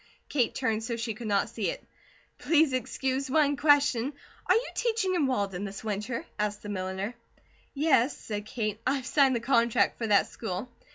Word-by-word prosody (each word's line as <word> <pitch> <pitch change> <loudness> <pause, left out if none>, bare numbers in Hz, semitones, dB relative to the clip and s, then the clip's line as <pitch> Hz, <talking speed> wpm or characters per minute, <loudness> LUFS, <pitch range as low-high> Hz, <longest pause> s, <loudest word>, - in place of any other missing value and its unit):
Kate 250 -6 +1
turned 225 -4 0
so 235 +1 -2
she 225 -1 -3
could 230 +1 -7
not 200 -1 +2
see 225 -2 -2
it. - - -5 0.6
"Please 315 -4 +3
excuse 265 +2 -1
one 290 0 +3
question. 285 -3 +3 0.3
Are - - +5
you 465 +3 +1
teaching 445 -6 0
in 320 -6 +2
Walden 200 -7 -1
this 200 0 -6
winter?" 215 +2 -3
asked 210 0 -2
the 210 - -6
milliner. 190 +2 -3 0.6
"Yes," 275 -3 +3
said 210 -1 -5
Kate. 215 -3 -3
"I 265 - +3
have 265 -3 -4
signed 270 -2 +4
the - - +1
contract 235 -1 +2
for 225 - -1
that 205 -2 +5
school." 220 +3 -5
235 Hz, 180 wpm, -28 LUFS, 210-275 Hz, 0.6 s, Are